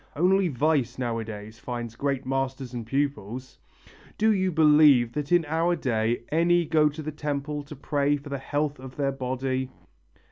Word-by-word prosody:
Only 185 Hz, +4 st, +3 dB
vice 140 Hz, -3 st, 0 dB
nowadays 110 Hz, -3 st, -4 dB
finds 120 Hz, -2 st, -5 dB
great 140 Hz, 0 st, -2 dB
masters 135 Hz, -1 st, -2 dB
and 115 Hz, -2 st, -5 dB
pupils!... 130 Hz, -2 st, -3 dB, 0.6 s
Do 220 Hz, +1 st, +4 dB
you 190 Hz, -2 st, +1 dB
believe 150 Hz, -6 st, +5 dB
that 150 Hz, 0 st, -4 dB
in 175 Hz, -2 st, +4 dB
our 165 Hz, +3 st, +1 dB
day 120 Hz, -5 st, -1 dB
any 170 Hz, +2 st, +3 dB
go 155 Hz, -1 st, +3 dB
to 155 Hz, +2 st, -8 dB
the 155 Hz, -, -4 dB
temple 150 Hz, 0 st, -3 dB
to 150 Hz, -, -9 dB
pray 145 Hz, +1 st, 0 dB
for 145 Hz, +1 st, -11 dB
the 140 Hz, -1 st, -3 dB
health 145 Hz, +1 st, -2 dB
of 130 Hz, 0 st, -10 dB
their 140 Hz, -1 st, 0 dB
body? 130 Hz, 0 st, -2 dB
140 Hz, 165 wpm, -26 LUFS, 125-155 Hz, 0.6 s, believe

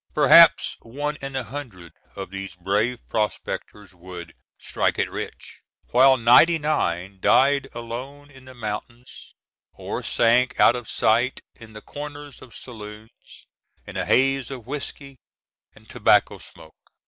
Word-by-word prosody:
Perhaps -, -, +6 dB
one 145 Hz, +6 st, -4 dB
in 135 Hz, -1 st, -7 dB
a 130 Hz, -, -2 dB
hundred 115 Hz, -9 st, -9 dB, 0.2 s
of 95 Hz, -2 st, -7 dB
these 95 Hz, -2 st, -7 dB
brave 105 Hz, +7 st, -1 dB
prospectors 105 Hz, -2 st, -4 dB
would 90 Hz, -1 st, -11 dB, 0.2 s
"strike -, -, -2 dB
it -, -, -1 dB
rich," -, -, -8 dB, 0.3 s
while 130 Hz, +2 st, +5 dB
ninety 125 Hz, +8 st, +5 dB
nine 95 Hz, -, -2 dB
died 140 Hz, +5 st, +3 dB
alone 130 Hz, +5 st, -8 dB
in 130 Hz, -2 st, -16 dB
the 130 Hz, 0 st, -13 dB
mountains 120 Hz, +2 st, -8 dB, 0.4 s
or -, -, -6 dB
sank 120 Hz, +3 st, +1 dB
out 120 Hz, -, +6 dB
of 120 Hz, -3 st, -7 dB
sight 120 Hz, +4 st, +1 dB
in 110 Hz, -2 st, -15 dB
the 105 Hz, -, -10 dB
corners 145 Hz, -1 st, -9 dB
of 125 Hz, -, -14 dB
saloons, 110 Hz, -2 st, -12 dB, 0.4 s
in -, -, -11 dB
a -, -, -1 dB
haze 135 Hz, -1 st, +1 dB
of 130 Hz, -5 st, -8 dB
whiskey 140 Hz, -1 st, -7 dB, 0.6 s
and -, -, -20 dB
tobacco -, -, +2 dB
smoke. 80 Hz, -1 st, -16 dB
120 Hz, 135 wpm, -23 LUFS, 105-135 Hz, 0.6 s, Perhaps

